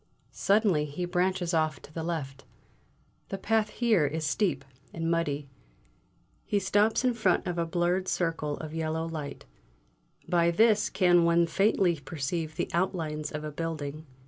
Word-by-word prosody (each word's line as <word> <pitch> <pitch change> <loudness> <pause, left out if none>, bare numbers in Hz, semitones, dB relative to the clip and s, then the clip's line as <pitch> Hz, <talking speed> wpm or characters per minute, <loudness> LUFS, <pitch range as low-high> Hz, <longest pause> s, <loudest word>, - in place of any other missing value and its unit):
Suddenly 195 -7 +2
he 150 +5 -4
branches 180 0 0
off 155 -3 +1
to 150 - -14
the 165 - -4
left; 140 -5 -4 0.9
the 195 - -3
path 220 +1 +1
here 215 -9 +2
is 155 +2 -3
steep 150 -4 0 0.3
and 165 0 -1
muddy. 150 -4 -1 1.0
He 205 - 0
stops 205 +5 +2
in 250 - +3
front 215 -6 +1
of 175 -2 -2
a 170 - 0
blurred 175 +2 0
circle 160 -5 -1
of 155 -1 -7
yellow 160 0 -2
light; 155 -3 -6 0.8
by 170 -1 +3
this 215 +4 +3
can 175 -2 +4
one 170 0 +4
faintly 180 -1 +2
perceive 155 +3 -4
the - - -1
outlines 160 -4 -1
of 150 0 -5
a 155 - -4
building. 155 -1 -5
170 Hz, 150 wpm, -28 LUFS, 155-185 Hz, 1.0 s, can